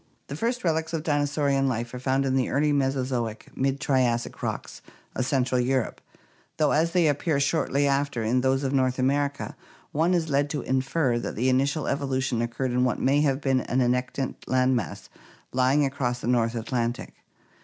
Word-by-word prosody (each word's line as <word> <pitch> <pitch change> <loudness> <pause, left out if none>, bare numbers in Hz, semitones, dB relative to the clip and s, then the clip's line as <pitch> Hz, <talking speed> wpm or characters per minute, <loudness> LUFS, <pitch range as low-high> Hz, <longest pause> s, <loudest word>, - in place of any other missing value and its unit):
The 140 - -4
first 240 +9 -2
relics 160 -1 0
of 160 -2 -2
dinosaurian 145 -2 +1
life 120 -1 -2
are 125 - -5
found 135 +1 +1
in 130 - 0
the 130 -2 +1
early 150 +2 +2
Mesozoic 130 -5 -1
(Mid 135 +1 0
Triassic) 125 -5 0
rocks - - -4 0.3
of 130 - -1
Central 130 -2 +1
Europe, 130 -1 -1 0.6
though 150 -2 +3
as 165 +2 +2
they 175 -3 +4
appear 145 +1 +1
shortly 145 -1 +1
after 140 -4 0
in 120 +3 +1
those 135 +1 +1
of 135 0 -1
North 130 -2 +1
America 140 +2 0 0.4
one 165 +4 +2
is 165 -2 0
led 140 0 +1
to 145 -1 -3
infer 130 -1 0
that - - -5
the 125 +4 +1
initial 140 +3 +1
evolution 135 -3 -1
occurred 120 +2 -2
in 125 +1 +2
what 125 - +1
may 140 +3 +2
have 140 -1 +1
been 135 -2 +2
an 125 - -1
annectant 125 +1 0
land 130 0 +2
mass 115 -6 -4 0.5
lying 130 +3 +3
across 135 -3 -1
the - - -7
North 120 -1 +2
Atlantic. 120 +1 -2
135 Hz, 180 wpm, -26 LUFS, 125-145 Hz, 0.6 s, they